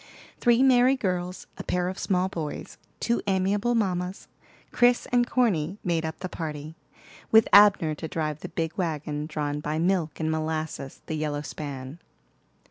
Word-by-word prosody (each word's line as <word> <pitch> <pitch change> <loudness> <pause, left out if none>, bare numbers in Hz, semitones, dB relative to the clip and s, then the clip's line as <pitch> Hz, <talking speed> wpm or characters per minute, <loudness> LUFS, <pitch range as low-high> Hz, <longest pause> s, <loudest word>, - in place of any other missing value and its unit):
Three 240 +1 +4
merry 255 0 +5
girls, 180 -6 -3
a - - -4
pair 180 0 0
of 185 +1 -4
small 185 -2 +1
boys, 160 -5 -6 0.2
two 235 0 0
amiable 200 +5 +1
mammas, 185 -3 -1 0.4
Chris 245 0 +3
and 245 -1 +3
Corny, 195 -8 +1
made 170 -3 0
up 160 0 -6
the 185 - -2
party, 155 -2 -6 0.5
with 220 0 +6
Abner 200 -6 +7
to 155 +2 -6
drive 155 -1 -3
the 180 - -7
big 165 -2 -3
wagon 150 -3 -2
drawn 150 -2 -2
by 150 +1 -2
Milk 170 -2 0
and 160 -1 0
Molasses, 155 -3 -3
the - - -4
yellow 150 -1 -2
span. 140 0 -7
170 Hz, 155 wpm, -26 LUFS, 155-200 Hz, 0.5 s, Abner